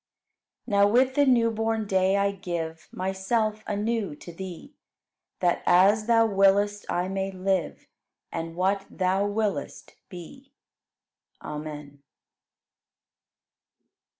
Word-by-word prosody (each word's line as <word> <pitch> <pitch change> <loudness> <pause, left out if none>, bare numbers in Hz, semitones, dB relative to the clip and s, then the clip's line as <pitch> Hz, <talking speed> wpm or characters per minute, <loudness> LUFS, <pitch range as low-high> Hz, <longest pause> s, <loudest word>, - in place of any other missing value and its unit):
15. 250 - -8
Now 200 - +6
with 255 +4 +3
the 285 +1 +3
new 235 -3 +4
born 225 0 -1
day 190 0 +2
I 200 0 +2
give 170 -4 -5
Myself 210 +4 -1
anew 210 -4 -2
to 170 +3 -11
Thee, 190 - -9 0.7
That 175 -1 +1
as 205 +4 +4
Thou 230 -1 +5
willest, 205 0 +2
I 175 +1 0
may 195 0 -2
live, 185 -3 -2 0.5
And 165 0 -5
what 195 +2 0
Thou 190 +2 0
willest, 205 0 -3 0.2
be. 195 - -12 0.9
Amen. 150 -2 -7
195 Hz, 110 wpm, -26 LUFS, 180-215 Hz, 0.9 s, Now